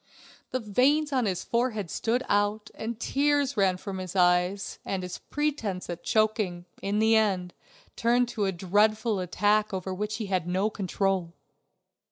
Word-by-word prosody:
The 255 - -1
veins 270 +8 +2
in 255 -5 +1
his 185 -3 -2
forehead 230 -7 -1
stood 240 +3 0
out, 205 +1 0
the 230 +2 -4
tears 285 +1 +1
ran 190 -3 +2
from 190 0 -6
his 185 0 -6
eyes, 180 +2 +2
and 190 -1 -3
his 180 - -6
pretense 230 -13 -2
at 170 0 -7
choking, 215 -5 +1 0.2
in 200 +1 -1
the 220 +1 +4
end, 190 -5 +1 0.4
turned 240 +1 +2
to 215 -4 -1
a 195 - +1
dreadful 210 +4 +1
attack 205 +3 +1
over 190 0 -3
which 210 +3 -3
he 220 - -4
had 185 -3 -1
no 190 +4 0
control. 190 -3 -1
205 Hz, 160 wpm, -27 LUFS, 185-225 Hz, 0.4 s, the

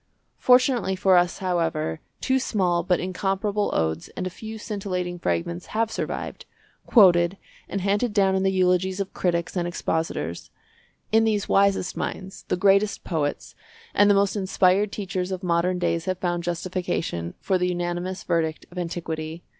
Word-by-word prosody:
Fortunately 250 -6 +4
for 190 0 +4
us, 175 0 +3
however, 165 - -1 0.2
two 265 0 +2
small 185 -8 +1
but 180 +1 +1
incomparable 195 +3 -1
odes 80 0 -1
and 185 - -2
a 185 - -3
few 220 +4 -8
scintillating 185 -4 -4
fragments 85 - -2
have 225 0 +1
survived, - - -4 0.4
quoted 180 -4 +5 0.3
and 195 - -2
handed 205 +5 +1
down 195 -2 +3
in 190 - +1
the 190 0 +2
eulogies 185 0 +2
of 195 -1 -3
critics 170 -1 -1
and 175 -1 0
expositors. 160 - -3 0.6
In 225 +1 +5
these 215 -3 +1
the - - -6
wisest 195 -2 +2
minds, 190 0 -5
the - - 0
greatest 200 +2 +3
poets, 150 -4 -2 0.4
and 205 0 +5
the 205 - +5
most 200 0 +2
inspired 195 0 +2
teachers 185 -2 -3
of 185 0 -4
modern 180 +1 +1
days 170 -2 -1
have 185 -1 -1
found 175 -2 -1
justification 170 - -3
for 190 -2 0
the 180 - +1
unanimous 175 +1 -3
verdict 160 -2 -1
of 180 - -6
antiquity. 165 -1 -4
185 Hz, 160 wpm, -24 LUFS, 175-195 Hz, 0.6 s, quoted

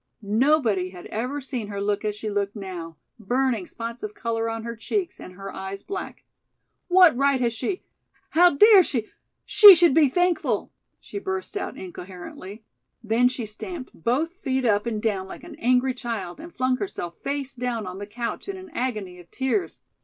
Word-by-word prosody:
Nobody 220 -3 +2
had 180 -1 -11
ever 250 +6 -3
seen 255 -5 -4
her 200 -1 -5
look 205 +1 -1
as 210 -1 -1
she 215 +1 -6
looked 205 0 -1
now, 175 -5 -7 0.2
burning 240 -2 0
spots 230 +1 -6
of 425 0 -6
color 230 - -2
on 225 0 -4
her 235 0 -5
cheeks 360 - -3
and 185 - -10
her 195 +1 -8
eyes 195 +1 -6
black. 390 0 -6 0.6
"What 360 -5 +6
right 275 +1 +2
has 240 -2 +1
she 260 - -3 0.5
how 350 +3 +7
dare 420 +5 +8
she 240 -10 -2 0.4
she 410 -3 +10
should 340 -3 +5
be 300 -2 +5
thankful 355 +2 0
" - - -52
she 405 - -7
burst 380 0 -4
out 400 - -4
incoherently. 185 +3 -9 0.4
Then 230 +3 +3
she 250 -2 -3
stamped 255 - -7
both 255 - 0
feet 265 -8 -2
up 210 0 +2
and 220 -2 -1
down 200 -4 -1
like - - -10
an - - -10
angry 255 +2 +2
child 230 -7 -5
and 335 +2 -9
flung 255 -3 0
herself 175 - -5
face 280 -1 -3
down 240 -3 -3
on 185 +1 -7
the 205 - -6
couch 235 - -5
in 390 - -4
an 370 -2 -11
agony 215 - -3
of 175 -1 -15
tears. 265 +9 -2
240 Hz, 185 wpm, -25 LUFS, 205-290 Hz, 0.6 s, she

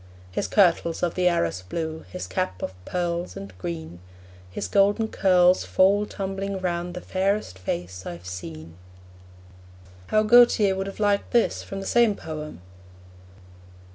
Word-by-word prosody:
His - - -2
kirtle's 170 -4 +2
of 175 - +1
the 180 -1 +1
Arras 95 - 0
blue, 160 - -5
His 90 - -5
cap 95 0 -3
of - - -3
pearls 175 -1 -2
and 100 -1 -9
green; 85 -1 -6 0.5
His 90 - -4
golden 205 +3 +3
curls 180 -3 +4
fall 200 +2 +3
tumbling 195 0 -4
round 175 -1 -3
The 180 - -5
fairest 190 - -1
face 90 0 -4
I've 85 0 -8
seen. 85 -3 -8 1.3
How 215 0 +3
Gautier 215 -3 +6
would 195 +1 -3
have 195 - -8
liked 205 -1 +1
this 235 - +2
from 195 0 -6
the - - -7
same 235 -2 +3
poem! 155 - -7
175 Hz, 140 wpm, -25 LUFS, -, 1.3 s, Gautier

